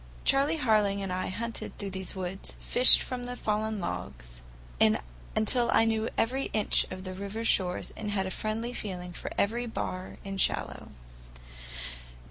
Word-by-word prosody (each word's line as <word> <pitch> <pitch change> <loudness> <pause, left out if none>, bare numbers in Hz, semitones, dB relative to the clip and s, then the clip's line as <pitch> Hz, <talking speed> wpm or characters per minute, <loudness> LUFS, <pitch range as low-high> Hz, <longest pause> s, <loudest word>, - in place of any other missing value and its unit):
Charley 285 +4 +3
Harling 210 -7 +2
and 190 -2 -3
I 185 0 -2
had 185 - -5
hunted 230 0 -5
through 200 -1 -4
these 190 +1 -4
woods, 190 +1 -5
fished 250 +1 +7
from 250 -1 -5
the 245 0 -5
fallen 215 -1 -1
logs, 60 - -6 0.4
until 200 - +1
I 225 - +5
knew 225 0 0
every 260 +4 +1
inch 215 -1 +3
of 185 - -7
the 185 -1 -6
river 200 +4 -5
shores 180 -4 +1
and 215 - -5
had 195 -2 0
a 190 - -4
friendly 225 +4 -2
feeling 180 -6 -5
for - - -5
every 235 +4 0
bar 185 -4 -5
and 195 -1 -2
shallow. - - 0
205 Hz, 160 wpm, -29 LUFS, 185-225 Hz, 0.4 s, fished